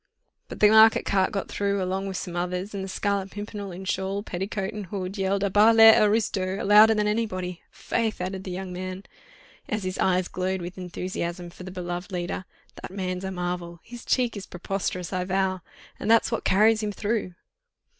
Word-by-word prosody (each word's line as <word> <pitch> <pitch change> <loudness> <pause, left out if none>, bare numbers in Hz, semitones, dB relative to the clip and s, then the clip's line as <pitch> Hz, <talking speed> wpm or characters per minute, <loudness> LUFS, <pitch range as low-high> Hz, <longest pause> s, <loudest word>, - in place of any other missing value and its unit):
But - - -9
the 210 - +8
market 220 +1 +6
cart 190 -1 +2
got 195 - -3
through 200 0 -1
along 190 +1 -2
with 190 -1 -4
some 175 -1 -5
others, 180 +3 -3
and 195 -1 -4
the - - -5
Scarlet 200 0 -1
Pimpernel, 205 -1 -6
in 185 +2 -8
shawl, 190 +2 -2
petticoat 195 +1 -4
and 210 -3 -6
hood, 190 0 -4
yelled 195 0 0
'À 200 -2 -1
bas 215 +2 +6
les 225 0 +9
aristos!' 205 -3 +1
louder 210 +2 +7
than 210 0 +1
anybody. 185 -5 -2
Faith!" 225 -2 -2
added 185 +1 -4
the 190 - -7
young 185 0 -5
man, 185 +1 -5 0.7
as 215 -1 -2
his 185 0 -4
eyes 185 -1 +2
glowed 185 +1 -2
with 175 +1 -7
enthusiasm 175 -1 -4
for - - -14
the 185 - -7
beloved 175 0 -5
leader, 180 +1 -3 0.4
"that - - -7
man's 185 -1 -4
a 190 - -3
marvel! 175 -2 -4
His 240 0 -10
cheek 245 -3 +1
is 200 - -7
preposterous, 185 0 -4
I 180 -1 0
vow!—and 190 +2 -3
that's 230 +1 +4
what 230 - -2
carries 215 +3 +4
him 210 -1 -2
through." 205 -3 -2
190 Hz, 190 wpm, -26 LUFS, 185-210 Hz, 0.7 s, les